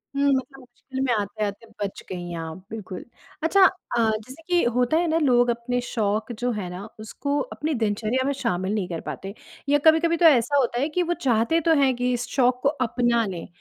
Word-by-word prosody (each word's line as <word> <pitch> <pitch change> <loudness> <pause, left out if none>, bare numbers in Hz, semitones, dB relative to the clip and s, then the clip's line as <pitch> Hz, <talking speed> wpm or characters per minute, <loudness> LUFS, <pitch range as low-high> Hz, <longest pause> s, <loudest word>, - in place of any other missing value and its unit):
हुँ 280 0 +1
मतलब 270 +1 -3
मुश्किल 260 +1 -10
में 255 - +1
आते-आते 205 +1 -3 0.2
बच 195 - -5
गई 175 -1 -5
आप, 160 0 -5
बिल्कुल। 195 -5 -7 0.4
अच्छा 385 +4 +5
अ, 360 -10 -1 0.3
जैसे 270 +6 -13
कि 355 -1 +3
होता 250 +6 +2
है 345 - +1
ना 320 0 +1
लोग 245 -4 +3
अपने 240 +1 -1
शौक 220 -1 -1
जो 245 0 +1
है 200 -5 -4
ना 180 +3 -7
उसको 280 +6 -3 0.2
अपनी 310 +1 -2
दिनचर्या 220 +5 0
में 280 - +2
शामिल 195 -7 -2
नहीं 205 -4 -1
कर 165 -2 -4
पाते। 195 +1 -6 0.4
या 290 - +5
कभी-कभी 330 +1 +5
तो 340 - +3
ऐसा 285 -2 +5
होता 245 -2 +1
है 290 - 0
कि 355 +3 0
वो 345 +1 0
चाहते 245 +3 +1
तो - - +6
हैं 265 -2 +3
कि 250 +1 0
इस 245 +1 -2
शौक 250 -1 +3
को 280 - +4
अपना 240 -4 +1
लें 185 -4 -6
245 Hz, 205 wpm, -24 LUFS, 215-280 Hz, 0.4 s, तो